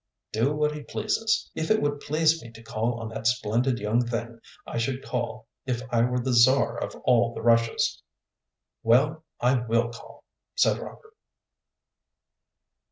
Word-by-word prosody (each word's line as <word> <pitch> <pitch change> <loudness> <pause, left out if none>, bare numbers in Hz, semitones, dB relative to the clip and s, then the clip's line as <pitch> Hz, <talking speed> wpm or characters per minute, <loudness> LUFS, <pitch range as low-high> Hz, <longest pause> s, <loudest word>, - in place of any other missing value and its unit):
"Do 120 +7 +1
what 150 0 +1
he 150 0 -6
pleases. 220 +9 -1
If 160 - -3
it 220 0 +4
would 145 0 -1
please 155 +2 +2
me 115 - -10
to 115 - -13
call 115 +2 -2
on 115 -1 -5
that 110 0 -3
splendid 120 +1 +1
young 110 +3 +1
thing, 120 0 -4 0.3
I - - -4
should 130 +3 -2
call 120 -3 -3 0.2
if 125 -1 -1
I 115 -1 +3
were 125 +1 +1
the 125 +1 -1
Czar 130 +3 +5
of - - -4
all 120 -2 +3
the - - -6
Russias." 115 -1 +2 0.8
"Well, 145 +8 +3 0.2
I 125 +1 +3
will 115 +1 +1
call," 115 - -13 0.3
said - - +3
Robert. 440 -1 -11
120 Hz, 160 wpm, -26 LUFS, 115-140 Hz, 0.8 s, Czar